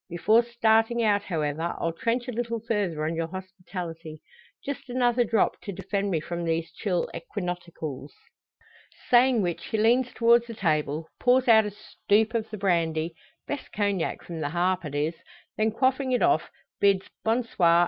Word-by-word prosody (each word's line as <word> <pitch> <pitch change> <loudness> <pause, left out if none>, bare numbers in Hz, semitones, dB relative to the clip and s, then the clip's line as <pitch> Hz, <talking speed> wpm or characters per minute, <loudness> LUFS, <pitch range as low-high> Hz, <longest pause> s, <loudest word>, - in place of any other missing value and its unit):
Before 210 +7 +4
starting 230 0 +2
out, 205 -2 +3
however, 160 -3 -2
I'll 165 - -1
trench 235 +8 -1
a - - -2
little 230 0 -2
further 205 -9 -1
on 160 +1 -1
your 165 0 -1
hospitality. 180 -3 -8 0.4
Just 280 -2 -5
another 245 -1 +2
drop, 225 -2 +1
to 200 - -6
defend 195 +2 -2
me 170 -4 +1
from 170 +2 -5
these 165 0 -1
chill 180 -4 -1
equinoctials." 170 -6 -5 1.0
Saying 245 -2 +5
which 175 -2 -3
he 220 - -1
leans 240 +4 +3
towards 235 0 +4
the 230 - -7
table, 155 -3 0
pours 255 +1 +3
out 220 -2 +6
a - - -2
stoop 215 +1 0
of 225 -1 -1
the 215 - -6
brandy 165 -4 0 0.3
best 290 - -5
Cognac 200 -4 -1
from 170 -2 -7
the 145 -2 -2
"Harp" 180 +2 0
it 145 -1 -5
is 150 +3 0 0.4
then 215 +1 +2
quaffing 260 +3 +1
it 250 - +2
off, 350 0 +2 0.3
bids 195 -1 +3 0.2
"bon 230 +3 +2
soir!" 170 -6 +3
200 Hz, 170 wpm, -26 LUFS, 170-230 Hz, 1.0 s, out